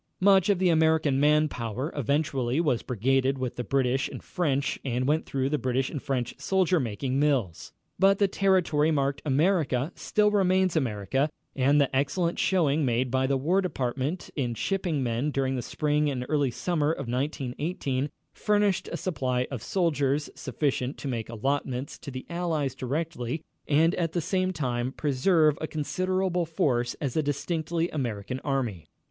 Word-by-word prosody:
Much 190 Hz, 0 st, +5 dB
of 200 Hz, -, +4 dB
the 185 Hz, 0 st, +2 dB
American 160 Hz, -4 st, +3 dB
man 150 Hz, +1 st, +4 dB
power 125 Hz, +2 st, -4 dB
eventually 140 Hz, -1 st, 0 dB
was 145 Hz, -8 st, +1 dB
brigaded 135 Hz, +3 st, +1 dB
with 130 Hz, -2 st, -3 dB
the 125 Hz, -, -3 dB
British 135 Hz, +1 st, +1 dB
and -, -, -8 dB
French 140 Hz, -6 st, -1 dB
and 125 Hz, -1 st, -1 dB
went 155 Hz, +2 st, +1 dB
through 135 Hz, -1 st, -1 dB
the 150 Hz, +1 st, 0 dB
British 130 Hz, +1 st, 0 dB
and 145 Hz, -, -4 dB
French 125 Hz, -3 st, -2 dB
soldier 185 Hz, -2 st, +2 dB
making 130 Hz, +2 st, -2 dB
mills. 130 Hz, -, 0 dB, 0.3 s
But 195 Hz, +1 st, +5 dB
the 200 Hz, -, +3 dB
territory 185 Hz, -6 st, +2 dB
marked 140 Hz, -2 st, 0 dB
America 150 Hz, -1 st, +1 dB
still 210 Hz, 0 st, +1 dB
remains 185 Hz, -3 st, +2 dB
America 135 Hz, +1 st, 0 dB, 0.3 s
and 140 Hz, +2 st, +3 dB
the 140 Hz, -2 st, +1 dB
excellent 170 Hz, +6 st, 0 dB
showing 160 Hz, -5 st, +2 dB
made 125 Hz, -1 st, +1 dB
by 130 Hz, 0 st, +2 dB
the 135 Hz, 0 st, +1 dB
War 170 Hz, +9 st, +2 dB
Department 140 Hz, -1 st, -3 dB
in 125 Hz, -5 st, -1 dB
shipping 175 Hz, -, -1 dB
men 120 Hz, +4 st, 0 dB
during 135 Hz, -2 st, 0 dB
the 125 Hz, -, -2 dB
spring 150 Hz, +2 st, 0 dB
and 125 Hz, -3 st, -3 dB
early 145 Hz, -3 st, +1 dB
summer 155 Hz, +4 st, 0 dB
of 140 Hz, -5 st, -4 dB
1918 135 Hz, +2 st, -2 dB, 0.2 s
furnished 205 Hz, -2 st, +1 dB
a -, -, -2 dB
supply 125 Hz, -7 st, -1 dB
of 130 Hz, -5 st, -4 dB
soldiers 150 Hz, -5 st, 0 dB
sufficient 135 Hz, -1 st, -2 dB
to -, -, -6 dB
make 115 Hz, -4 st, -3 dB
allotments 130 Hz, +3 st, -2 dB
to -, -, -8 dB
the 130 Hz, -1 st, -7 dB
Allies 165 Hz, -6 st, -1 dB
directly 140 Hz, +1 st, -3 dB, 0.2 s
and 160 Hz, +4 st, +4 dB
at 165 Hz, -2 st, -1 dB
the 175 Hz, -, +1 dB
same 185 Hz, +2 st, 0 dB
time 125 Hz, -5 st, -2 dB
preserve 150 Hz, +2 st, +2 dB
a 155 Hz, -, -2 dB
considerable 185 Hz, +3 st, -1 dB
force 125 Hz, -7 st, 0 dB
as 135 Hz, -5 st, -4 dB
a 160 Hz, -, +3 dB
distinctly 160 Hz, +3 st, -1 dB
American 125 Hz, -3 st, -3 dB
Army. 120 Hz, -, -2 dB
145 Hz, 165 wpm, -27 LUFS, 130-165 Hz, 0.3 s, Much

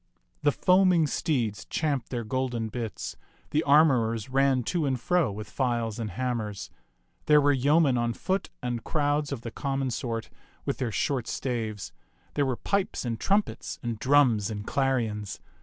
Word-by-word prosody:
The 145 Hz, -, +4 dB
foaming 180 Hz, 0 st, +4 dB
steeds 120 Hz, -9 st, -1 dB
champed 140 Hz, -6 st, -1 dB
their 120 Hz, -2 st, -3 dB
golden 120 Hz, -1 st, -2 dB
bits, 115 Hz, -2 st, -5 dB, 0.4 s
the 150 Hz, -, +2 dB
armorers 130 Hz, -8 st, +3 dB
ran 135 Hz, -1 st, +3 dB
to 160 Hz, +4 st, 0 dB
and 130 Hz, -2 st, 0 dB
fro 175 Hz, -, +2 dB
with 105 Hz, +2 st, -7 dB
files 120 Hz, -4 st, -1 dB
and 110 Hz, -2 st, -3 dB
hammers. 110 Hz, -1 st, -3 dB, 0.6 s
There 150 Hz, -1 st, +7 dB
were 145 Hz, 0 st, +4 dB
yeomen 140 Hz, 0 st, +3 dB
on 120 Hz, 0 st, 0 dB
foot 190 Hz, +8 st, -2 dB
and 120 Hz, -2 st, -2 dB
crowds 145 Hz, -1 st, 0 dB
of 135 Hz, -5 st, -3 dB
the 115 Hz, -, -6 dB
common 135 Hz, 0 st, -2 dB
sort 115 Hz, -1 st, -3 dB, 0.3 s
with -, -, -2 dB
their 120 Hz, -3 st, -1 dB
short 130 Hz, +1 st, -1 dB
staves. 110 Hz, -6 st, -3 dB, 0.4 s
There 145 Hz, -2 st, +1 dB
were 130 Hz, -, 0 dB
pipes 200 Hz, -8 st, -1 dB
and 115 Hz, -2 st, -2 dB
trumpets 200 Hz, +1 st, 0 dB
and 115 Hz, -3 st, -3 dB
drums 125 Hz, -6 st, +4 dB
and 105 Hz, -1 st, -5 dB
clarions. 115 Hz, -8 st, -1 dB
130 Hz, 155 wpm, -27 LUFS, 115-145 Hz, 0.6 s, There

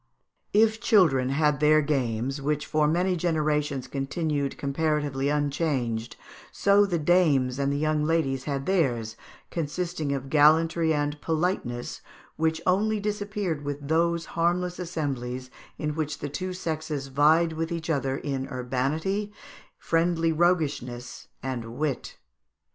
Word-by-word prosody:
] -, -, -49 dB
If 220 Hz, +2 st, +3 dB
children 160 Hz, -, +4 dB
had 150 Hz, 0 st, +2 dB
their 155 Hz, 0 st, +5 dB
games, 135 Hz, -1 st, -1 dB
which 150 Hz, +1 st, -1 dB
for 155 Hz, -1 st, +2 dB
many 180 Hz, +4 st, +1 dB
generations 150 Hz, -5 st, 0 dB
continued 140 Hz, 0 st, -2 dB
comparatively 145 Hz, -1 st, 0 dB
unchanged, 140 Hz, -6 st, -1 dB, 0.4 s
so 200 Hz, +1 st, +4 dB
the 175 Hz, -3 st, 0 dB
dames 150 Hz, -6 st, +3 dB
and 140 Hz, 0 st, +1 dB
the 140 Hz, -, 0 dB
young 155 Hz, 0 st, +1 dB
ladies 150 Hz, -5 st, 0 dB
had 140 Hz, -2 st, -2 dB
theirs, 120 Hz, -, 0 dB, 0.4 s
consisting 165 Hz, -1 st, -2 dB
of 135 Hz, -1 st, -3 dB
gallantry 160 Hz, +2 st, +4 dB
and 145 Hz, -1 st, -1 dB
politeness, 160 Hz, -7 st, -2 dB, 0.3 s
which 160 Hz, +1 st, 0 dB
only 210 Hz, +4 st, +2 dB
disappeared 205 Hz, -6 st, -2 dB
with 145 Hz, 0 st, -5 dB
those 170 Hz, +1 st, +2 dB
harmless 175 Hz, +2 st, 0 dB
assemblies 130 Hz, -7 st, -4 dB, 0.3 s
in 150 Hz, -1 st, -2 dB
which 155 Hz, -1 st, -3 dB
the 145 Hz, -, -5 dB
two 185 Hz, +6 st, -4 dB
sexes 155 Hz, -5 st, -3 dB
vied 155 Hz, +4 st, +4 dB
with 165 Hz, +1 st, -3 dB
each 165 Hz, -1 st, -2 dB
other 135 Hz, -2 st, 0 dB
in 135 Hz, -2 st, -3 dB
urbanity, 140 Hz, +11 st, -2 dB, 0.5 s
friendly 165 Hz, 0 st, +1 dB
roguishness, 150 Hz, -8 st, -1 dB, 0.2 s
and 120 Hz, -3 st, -4 dB
wit. 145 Hz, -4 st, -3 dB
150 Hz, 130 wpm, -26 LUFS, 135-170 Hz, 0.5 s, their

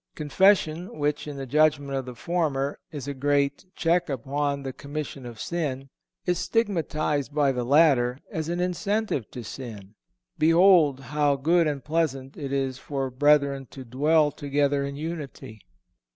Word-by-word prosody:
Confession, 170 Hz, +1 st, +2 dB
which, 145 Hz, 0 st, -1 dB
in 145 Hz, -1 st, -6 dB
the 135 Hz, -, -5 dB
judgment 145 Hz, +1 st, +2 dB
of 135 Hz, -1 st, -2 dB
the 125 Hz, -1 st, -8 dB
former, 145 Hz, -2 st, -1 dB
is 145 Hz, -4 st, -6 dB
a 140 Hz, -, -2 dB
great 140 Hz, +2 st, 0 dB
"check 170 Hz, 0 st, +1 dB
upon 140 Hz, +2 st, -2 dB
the 135 Hz, -1 st, -5 dB
commission 140 Hz, -2 st, -6 dB
of 115 Hz, -2 st, -10 dB
sin," 135 Hz, -6 st, -3 dB, 0.4 s
is 180 Hz, -1 st, +1 dB
stigmatized 155 Hz, -, -1 dB
by 145 Hz, -2 st, +3 dB
the 125 Hz, -2 st, -2 dB
latter 130 Hz, -3 st, +4 dB
as 160 Hz, 0 st, -3 dB
an 175 Hz, +1 st, -2 dB
incentive 180 Hz, -, -1 dB
to 125 Hz, -, -8 dB
sin. 110 Hz, -4 st, -8 dB, 0.5 s
"Behold 165 Hz, -3 st, +5 dB
how 145 Hz, -1 st, +3 dB
good 165 Hz, +4 st, +2 dB
and 145 Hz, -3 st, -3 dB
pleasant 140 Hz, -4 st, -1 dB
it 140 Hz, -2 st, -5 dB
is 135 Hz, -1 st, -1 dB
for 135 Hz, -2 st, -3 dB
brethren 140 Hz, 0 st, +3 dB
to 130 Hz, -1 st, -10 dB
dwell 150 Hz, +5 st, +2 dB
together 145 Hz, 0 st, 0 dB
in 140 Hz, 0 st, -4 dB
unity." 145 Hz, -7 st, -7 dB
145 Hz, 150 wpm, -26 LUFS, 135-160 Hz, 0.5 s, Behold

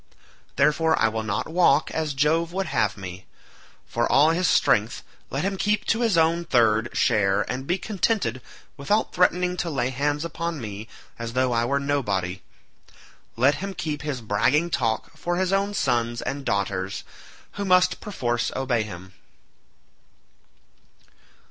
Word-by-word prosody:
Therefore 150 Hz, +3 st, +3 dB
I 110 Hz, -, +3 dB
will 110 Hz, 0 st, -3 dB
not 105 Hz, -3 st, -2 dB
walk 160 Hz, -3 st, +3 dB
as 155 Hz, -3 st, -2 dB
Jove 160 Hz, +4 st, +1 dB
would 195 Hz, +1 st, -1 dB
have -, -, 0 dB
me. 95 Hz, -1 st, -8 dB, 0.6 s
For 120 Hz, 0 st, -1 dB
all 150 Hz, +3 st, +5 dB
his 175 Hz, +2 st, +1 dB
strength, 110 Hz, -5 st, +2 dB, 0.3 s
let 135 Hz, -, -2 dB
him 195 Hz, 0 st, -1 dB
keep 210 Hz, +1 st, 0 dB
to 225 Hz, -, +1 dB
his 225 Hz, -7 st, +2 dB
own 165 Hz, +1 st, +3 dB
third 115 Hz, -5 st, +2 dB
share 100 Hz, -4 st, +2 dB
and 130 Hz, +2 st, -5 dB
be 175 Hz, -, +1 dB
contented 195 Hz, -, -1 dB, 0.4 s
without 205 Hz, +10 st, 0 dB
threatening 180 Hz, 0 st, +2 dB
to 175 Hz, -, -2 dB
lay 130 Hz, -4 st, -1 dB
hands 145 Hz, +4 st, -1 dB
upon 170 Hz, 0 st, -4 dB
me 105 Hz, -2 st, -7 dB, 0.3 s
as 115 Hz, 0 st, -5 dB
though 130 Hz, 0 st, +1 dB
I 115 Hz, 0 st, +1 dB
were 140 Hz, +3 st, +1 dB
nobody. 100 Hz, -11 st, -1 dB, 0.9 s
Let 130 Hz, +5 st, +4 dB
him 195 Hz, -1 st, -5 dB
keep 150 Hz, -3 st, -3 dB
his 145 Hz, -4 st, -4 dB
bragging 130 Hz, +11 st, +1 dB
talk 120 Hz, +3 st, -1 dB
for 175 Hz, +3 st, -2 dB
his 185 Hz, +1 st, 0 dB
own 200 Hz, +1 st, 0 dB
sons 120 Hz, -6 st, 0 dB
and 135 Hz, +2 st, -4 dB
daughters, 100 Hz, -1 st, -2 dB, 0.5 s
who 205 Hz, -, -5 dB
must 185 Hz, -1 st, +3 dB
perforce 120 Hz, -, -2 dB
obey 130 Hz, -3 st, 0 dB
him." 95 Hz, -3 st, -8 dB
140 Hz, 150 wpm, -24 LUFS, 115-170 Hz, 0.9 s, all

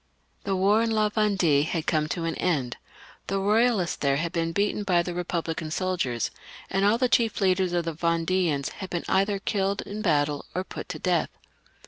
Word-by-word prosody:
The 195 Hz, -1 st, 0 dB
war 200 Hz, +4 st, +3 dB
in 230 Hz, -, +1 dB
La 215 Hz, -1 st, +2 dB
Vendue 195 Hz, -9 st, +2 dB
had 160 Hz, +1 st, -2 dB
come 155 Hz, -2 st, +1 dB
to 170 Hz, +2 st, -2 dB
an 165 Hz, 0 st, -1 dB
end, 140 Hz, -9 st, -1 dB, 0.5 s
the 195 Hz, -, -1 dB
Eoyal 215 Hz, +1 st, +3 dB
ists 170 Hz, -, -3 dB
there 140 Hz, -1 st, +1 dB
had 165 Hz, +2 st, -2 dB
been 165 Hz, -2 st, -1 dB
beaten 205 Hz, +4 st, 0 dB
by 180 Hz, -4 st, +2 dB
the 175 Hz, -, -4 dB
Eepublican 170 Hz, -2 st, -3 dB
soldiers, 170 Hz, -, -1 dB, 0.4 s
and 195 Hz, +1 st, +1 dB
all 205 Hz, +3 st, +4 dB
the 255 Hz, +1 st, +2 dB
chief 235 Hz, -2 st, +2 dB
leaders 185 Hz, -2 st, +2 dB
of 175 Hz, -1 st, 0 dB
the 165 Hz, -, -2 dB
Vend^ans 165 Hz, -2 st, 0 dB
had 190 Hz, -2 st, -7 dB
been 175 Hz, -, -3 dB
either 195 Hz, +1 st, +2 dB
killed 195 Hz, 0 st, -1 dB
in 210 Hz, +2 st, -6 dB
battle 145 Hz, -5 st, +1 dB
or 185 Hz, -, 0 dB
put -, -, -8 dB
to 175 Hz, -, -4 dB
death. 175 Hz, 0 st, +1 dB
180 Hz, 195 wpm, -26 LUFS, 165-200 Hz, 0.5 s, all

